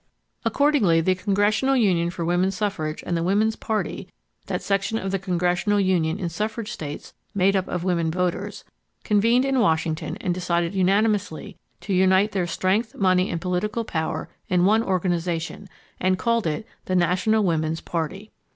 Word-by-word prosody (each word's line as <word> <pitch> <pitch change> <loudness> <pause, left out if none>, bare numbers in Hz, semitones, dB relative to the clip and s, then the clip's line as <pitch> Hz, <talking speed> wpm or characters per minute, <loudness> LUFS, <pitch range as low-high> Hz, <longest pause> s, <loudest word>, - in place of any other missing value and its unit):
Accordingly, 280 - +3
the 185 +3 +2
Congressional 205 +7 +1
Union 180 -7 +2
for 175 -1 -4
Woman 175 +2 +2
Suffrage 195 -6 -3
and 175 - -1
the 165 - 0
Woman's 210 +5 +2
Party, 220 -2 -3 0.4
that - - -3
section 200 +2 0
of 195 -3 -3
the 195 - 0
Congressional 180 +2 +1
Union 180 -4 +1
in 185 -4 -3
suffrage 215 +6 -3
states 150 -7 -7 0.2
made 195 +1 +3
up 190 -1 0
of 180 -1 -3
women 170 -3 +1
voters, 180 +1 -2 0.4
convened 230 +5 +3
in 270 -1 +1
Washington 160 -6 0
and 180 - -1
decided 175 -1 -1
unanimously 200 -1 +1 0.3
to 200 - -3
unite 190 +3 +4
their 185 -4 -1
strength, 195 +6 0
money 185 -1 +2
and 170 -2 -3
political 190 +6 -1
power 160 -5 -3 0.2
in 180 -1 +3
one 215 +3 +4
organization, 180 -1 -2 0.3
and 185 0 +2
called 230 -2 +1
it 160 +8 -2 0.2
the 185 - -1
National 185 +5 +2
Woman's 160 -3 0
Party. 175 +6 -4
185 Hz, 160 wpm, -24 LUFS, 175-210 Hz, 0.4 s, unite